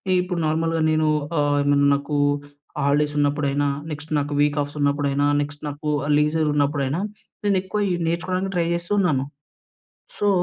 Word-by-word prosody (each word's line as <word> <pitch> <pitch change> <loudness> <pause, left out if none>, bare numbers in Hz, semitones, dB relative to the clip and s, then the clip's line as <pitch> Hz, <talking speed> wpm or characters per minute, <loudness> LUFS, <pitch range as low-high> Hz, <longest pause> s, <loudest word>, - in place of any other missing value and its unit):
ఈప్పుడు 180 -1 0
నార్మల్‌గా 165 +1 0
నేను 155 0 +2 0.3
ఆహ్, 145 0 +2
ఏమన్నా 145 0 +3
నాకు 140 +1 -3 0.7
హాలిడేస్ 145 +1 +2
ఉన్నపుడైనా, 145 0 +1 0.2
నెక్స్ట్ 150 +1 -7
నాకు 145 +1 -3
వీక్ 145 0 +2
ఆఫ్స్ 145 +1 -5
ఉన్నప్పుడైనా, 145 0 +1
నెక్స్ట్ 145 +1 -6
నాకు 150 +1 -5 0.2
ఆహ్, 150 - 0
లీజరున్నప్పుడైనా, 150 0 +1 0.4
నేనెక్కువ 195 +1 0
ఈ - - +1
నేర్చుకోవడానికి 185 +3 -1
ట్రై 170 -1 +1
జేస్తు 170 +3 -2
ఉన్నాను. 145 -8 +1 0.9
సో, 205 - +2
150 Hz, 140 wpm, -23 LUFS, 145-165 Hz, 0.9 s, ఏమన్నా